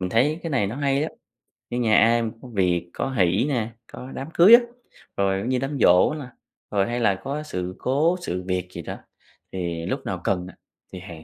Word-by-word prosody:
Mình 90 Hz, -1 st, -3 dB
thấy 150 Hz, +8 st, +2 dB
cái 165 Hz, -, -4 dB
này 125 Hz, -9 st, +1 dB
nó 115 Hz, +6 st, -5 dB
hay 140 Hz, 0 st, +1 dB
á, 160 Hz, -, -1 dB, 0.6 s
như 120 Hz, -, -2 dB
nhà 110 Hz, -3 st, +3 dB
ai 115 Hz, +2 st, +4 dB
mà 115 Hz, -, -1 dB
có 130 Hz, -, -10 dB
việc, 90 Hz, -3 st, +1 dB
có -, -, -2 dB
hỷ 95 Hz, -1 st, +2 dB
nè, 115 Hz, -5 st, -1 dB, 0.2 s
có 130 Hz, -, -9 dB
đám 135 Hz, -, -6 dB
cưới 190 Hz, +7 st, +7 dB
á, 240 Hz, -, +5 dB, 0.6 s
rồi, 95 Hz, -1 st, +1 dB
giống 115 Hz, +6 st, -3 dB
như, 130 Hz, -1 st, +1 dB
đám 135 Hz, +2 st, -3 dB
giỗ 90 Hz, +8 st, +5 dB
nè, 150 Hz, -3 st, -6 dB, 0.5 s
rồi 100 Hz, -2 st, +2 dB
hay 120 Hz, +1 st, -1 dB
là 100 Hz, -5 st, +3 dB
có 145 Hz, +3 st, -3 dB
sự 90 Hz, -10 st, -5 dB
cố, 155 Hz, +7 st, +1 dB
sự 90 Hz, -, -3 dB
việc 90 Hz, -1 st, -2 dB
gì 85 Hz, -, -7 dB
đó, -, -, -6 dB, 0.6 s
thì 85 Hz, -3 st, -3 dB
lúc -, -, -3 dB
nào -, -, -3 dB
cần 90 Hz, -2 st, -1 dB
á -, -, -14 dB, 0.4 s
thì 90 Hz, -, -6 dB
hàng 85 Hz, -4 st, -10 dB
110 Hz, 230 wpm, -24 LUFS, 90-135 Hz, 0.6 s, cưới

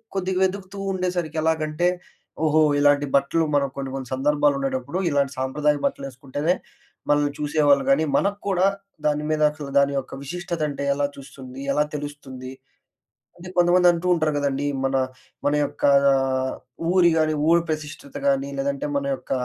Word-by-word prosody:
కొద్దిగ 190 Hz, -1 st, -1 dB
వెదుగుతూ 190 Hz, +1 st, -2 dB, 0.2 s
ఉండేసరికి 180 Hz, -4 st, -2 dB
ఎలాగంటే 160 Hz, +1 st, 0 dB, 0.6 s
ఓహో! 155 Hz, 0 st, +4 dB, 0.2 s
ఇలాంటి 145 Hz, 0 st, +3 dB
బట్టలు 140 Hz, +4 st, +2 dB
మనకు 140 Hz, -2 st, +1 dB
కొన్ని, 135 Hz, -1 st, -4 dB
కొన్ని 130 Hz, -2 st, -6 dB
సందర్భాలుండేటప్పుడు 140 Hz, +1 st, 0 dB
ఇలాంటి 140 Hz, -2 st, +1 dB
సాంప్రదాయ 145 Hz, +3 st, +1 dB
బట్టలేసుకుంటేనే 140 Hz, +4 st, -2 dB, 0.5 s
మనల్ని 145 Hz, -1 st, +2 dB
చూసేవాళ్ళు 145 Hz, -2 st, +3 dB
గానీ, 150 Hz, +4 st, +3 dB
మనకు 200 Hz, +1 st, 0 dB
కూడా 185 Hz, -1 st, +2 dB, 0.4 s
దాని 150 Hz, 0 st, 0 dB
మీద 155 Hz, 0 st, 0 dB
అసలు 150 Hz, -2 st, -8 dB
దాని 140 Hz, 0 st, +2 dB
యొక్క 130 Hz, -, -9 dB
విశిష్టత 175 Hz, +3 st, -5 dB
అంటే 140 Hz, 0 st, -5 dB
ఎలా 145 Hz, 0 st, +1 dB
చూస్తుంది? 135 Hz, -1 st, -11 dB
ఎలా 150 Hz, +1 st, +2 dB
తెలుస్తుంది? 140 Hz, -3 st, -7 dB, 0.9 s
అది 175 Hz, +1 st, -10 dB
కొంతమంది 175 Hz, +1 st, +5 dB
అంటూ 170 Hz, +1 st, -4 dB
ఉంటరు 155 Hz, -2 st, 0 dB
గదండీ, 140 Hz, 0 st, -1 dB, 0.2 s
మన 135 Hz, 0 st, 0 dB, 0.5 s
మన 145 Hz, -, +2 dB
యొక్క -, -, -8 dB, 0.3 s
ఆహ్, 130 Hz, -1 st, 0 dB, 0.4 s
ఊరి 175 Hz, -2 st, +5 dB
గానీ 155 Hz, 0 st, +2 dB, 0.2 s
ఊరు 170 Hz, 0 st, +5 dB
ప్రతిష్టత 155 Hz, -, -6 dB
గానీ 275 Hz, 0 st, +1 dB
లేదంటే, 280 Hz, +1 st, -2 dB
మన 280 Hz, -, -4 dB
యొక్క -, -, -21 dB
150 Hz, 145 wpm, -23 LUFS, 140-175 Hz, 0.9 s, కొంతమంది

